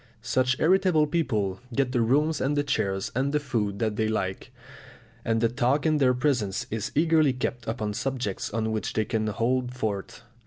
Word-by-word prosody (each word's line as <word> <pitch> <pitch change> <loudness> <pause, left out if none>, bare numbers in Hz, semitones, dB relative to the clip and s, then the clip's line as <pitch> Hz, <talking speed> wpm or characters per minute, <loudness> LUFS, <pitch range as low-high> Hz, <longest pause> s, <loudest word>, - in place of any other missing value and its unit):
Such 130 0 +1
irritable 180 -2 +4
people 110 - -1 0.2
get 135 -1 +1
the 125 -2 +1
rooms 145 +6 +2
and 145 +2 0
the 145 - +2
chairs 100 -8 -1
and 135 +3 0
the 150 - +1
food 110 -8 -2
that 110 -1 -1
they 110 - +1
like, 95 -3 -3 0.7
and 115 0 0
the 115 - +4
talk 125 +5 +1
in 155 -1 +3
their 125 -2 +4
presence 125 -8 0
is 110 0 -3
eagerly 155 -3 +4
kept 125 -2 -4
upon 110 -2 -2
subjects 125 -4 -3
on 110 +1 -1
which 110 -1 -2
they 110 - 0
can 110 -1 -1
hold 125 +4 -1
forth. 110 -1 -4
125 Hz, 185 wpm, -26 LUFS, 110-140 Hz, 0.7 s, irritable